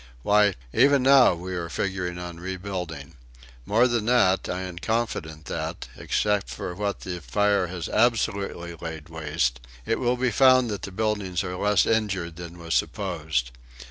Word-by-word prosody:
Why, 105 Hz, -2 st, +4 dB, 0.2 s
even 140 Hz, +2 st, +5 dB
now 130 Hz, -7 st, +6 dB
we 90 Hz, +2 st, -6 dB
are 85 Hz, -2 st, -3 dB
figuring 90 Hz, 0 st, -2 dB
on 90 Hz, -1 st, -7 dB
rebuilding. 90 Hz, -5 st, -6 dB, 0.5 s
More 115 Hz, +4 st, +4 dB
than 120 Hz, -3 st, -1 dB
that, 105 Hz, -7 st, +3 dB
I 90 Hz, -, -2 dB
am 90 Hz, -2 st, -6 dB
confident 95 Hz, -9 st, -2 dB
that, 80 Hz, +1 st, -5 dB
except 105 Hz, -1 st, 0 dB
for 90 Hz, -, -5 dB
what 100 Hz, +2 st, -3 dB
fire 95 Hz, +4 st, 0 dB
has 90 Hz, -1 st, -5 dB
absolutely 100 Hz, -6 st, 0 dB
laid 80 Hz, -2 st, -8 dB
waste, 75 Hz, -6 st, -1 dB, 0.3 s
it -, -, 0 dB
will 125 Hz, 0 st, +1 dB
be 125 Hz, 0 st, +1 dB
found 130 Hz, -3 st, +5 dB
that 100 Hz, -3 st, -4 dB
the 100 Hz, -, -6 dB
buildings 100 Hz, -3 st, -1 dB
are 90 Hz, -1 st, -4 dB
less 100 Hz, 0 st, +3 dB
injured 95 Hz, -7 st, -1 dB
than 85 Hz, 0 st, -8 dB
was 85 Hz, -1 st, -4 dB
supposed. 80 Hz, -, -1 dB
95 Hz, 155 wpm, -25 LUFS, 85-105 Hz, 0.5 s, now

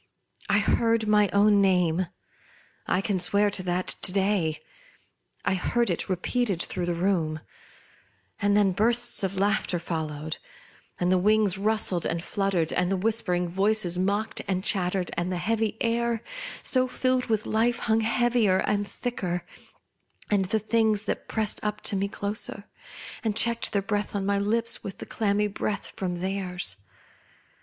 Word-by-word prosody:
I 200 Hz, -, +4 dB
heard 225 Hz, +1 st, +2 dB
my 210 Hz, -1 st, +4 dB
own 205 Hz, 0 st, +4 dB
name, 180 Hz, -2 st, +2 dB, 0.8 s
I 180 Hz, -, +1 dB
can 195 Hz, -2 st, -1 dB
swear 200 Hz, +3 st, +2 dB
to 190 Hz, -, +1 dB
that 180 Hz, 0 st, -1 dB, 0.2 s
to -, -, +2 dB
day! 190 Hz, -5 st, 0 dB, 0.9 s
I -, -, +2 dB
heard 220 Hz, +4 st, 0 dB
it 170 Hz, -, -3 dB
repeated 195 Hz, +2 st, 0 dB
through 180 Hz, 0 st, -3 dB
the 175 Hz, -, 0 dB
room; 170 Hz, -4 st, 0 dB, 1.0 s
and 205 Hz, 0 st, +3 dB
then 200 Hz, -2 st, +4 dB
bursts 235 Hz, +5 st, +2 dB
of 195 Hz, -1 st, -2 dB
laughter 195 Hz, -2 st, +1 dB
followed, 160 Hz, -2 st, -4 dB, 0.6 s
and 180 Hz, 0 st, +1 dB
the 185 Hz, -, +4 dB
wings 205 Hz, -1 st, +3 dB
rustled 210 Hz, -4 st, +1 dB
and 165 Hz, 0 st, -3 dB
fluttered, 195 Hz, -5 st, 0 dB
and 180 Hz, +1 st, +1 dB
the 195 Hz, -, +1 dB
whisper 215 Hz, -2 st, +1 dB
ing 175 Hz, 0 st, -1 dB
voices 190 Hz, 0 st, +2 dB
mocked 200 Hz, +3 st, 0 dB
and 185 Hz, -1 st, -1 dB
chattered, 185 Hz, -2 st, 0 dB
and 175 Hz, +2 st, -1 dB
the 180 Hz, -, -1 dB
heavy 220 Hz, +3 st, -1 dB
air, 235 Hz, 0 st, 0 dB, 0.4 s
so 255 Hz, -1 st, +2 dB
filled 255 Hz, 0 st, 0 dB
with 220 Hz, -2 st, 0 dB
life, 230 Hz, +2 st, +1 dB
hung 220 Hz, -1 st, +1 dB
heavier 230 Hz, -3 st, +2 dB
and 205 Hz, +1 st, 0 dB
thicker, 180 Hz, -9 st, -4 dB, 0.9 s
and 200 Hz, -2 st, +3 dB
the 220 Hz, -, 0 dB
Things 220 Hz, -1 st, +1 dB, 0.2 s
pressed 220 Hz, -1 st, -1 dB
up 210 Hz, 0 st, -2 dB
t 205 Hz, -, +2 dB
o -, -, 0 dB
me 200 Hz, -, 0 dB
closer, 205 Hz, 0 st, -2 dB, 0.6 s
and 220 Hz, -2 st, 0 dB
checked 235 Hz, 0 st, +3 dB
the 200 Hz, -1 st, 0 dB
breath 205 Hz, 0 st, -2 dB
on 195 Hz, -1 st, -1 dB
my 200 Hz, 0 st, +1 dB
lips 225 Hz, +3 st, +1 dB
with 195 Hz, -, -7 dB
the -, -, -8 dB
clammy 210 Hz, -1 st, 0 dB
breath 205 Hz, 0 st, -3 dB
from 180 Hz, -2 st, -3 dB
theirs. 185 Hz, -, -2 dB
200 Hz, 160 wpm, -26 LUFS, 180-220 Hz, 1.0 s, I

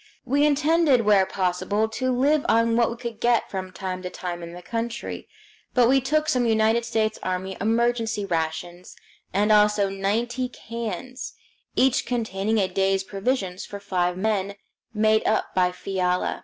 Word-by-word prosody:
We 285 Hz, +4 st, +3 dB
intended 300 Hz, -2 st, +3 dB
where 205 Hz, -3 st, +4 dB
possible 190 Hz, +3 st, 0 dB
to 255 Hz, +4 st, -2 dB
live 285 Hz, +4 st, +2 dB
on 230 Hz, 0 st, +3 dB
what 235 Hz, -1 st, +3 dB
we 235 Hz, -, -6 dB
could 235 Hz, -2 st, -6 dB
get 240 Hz, -1 st, +1 dB
from 185 Hz, -1 st, -4 dB
time 185 Hz, 0 st, -5 dB
to 180 Hz, -, -5 dB
time 175 Hz, -1 st, -5 dB
in 170 Hz, 0 st, -8 dB
the 180 Hz, 0 st, -10 dB
country, 230 Hz, +2 st, -4 dB, 0.5 s
but 245 Hz, -2 st, +5 dB
we 270 Hz, +2 st, +4 dB
took 305 Hz, +4 st, +1 dB
some 250 Hz, -5 st, +2 dB
United 225 Hz, +1 st, +2 dB
States 220 Hz, -2 st, -1 dB
Army 185 Hz, +1 st, -3 dB
emergency 225 Hz, -1 st, +1 dB
rations, 170 Hz, +1 st, -3 dB, 0.4 s
and 205 Hz, +3 st, +2 dB
also 210 Hz, -1 st, +4 dB
ninety 230 Hz, +6 st, -1 dB
cans, 235 Hz, +2 st, -6 dB, 0.4 s
each 265 Hz, -1 st, +2 dB
containing 220 Hz, -3 st, -1 dB
a 195 Hz, -3 st, +2 dB
day's 195 Hz, +1 st, +1 dB
provisions 195 Hz, -2 st, -2 dB
for 200 Hz, -, -7 dB
five 180 Hz, -2 st, -1 dB
men, 200 Hz, -1 st, -1 dB, 0.4 s
made 215 Hz, 0 st, +2 dB
up 220 Hz, -, 0 dB
by 180 Hz, -1 st, +2 dB
Fiala. 180 Hz, -1 st, -1 dB
215 Hz, 155 wpm, -24 LUFS, 190-240 Hz, 0.5 s, but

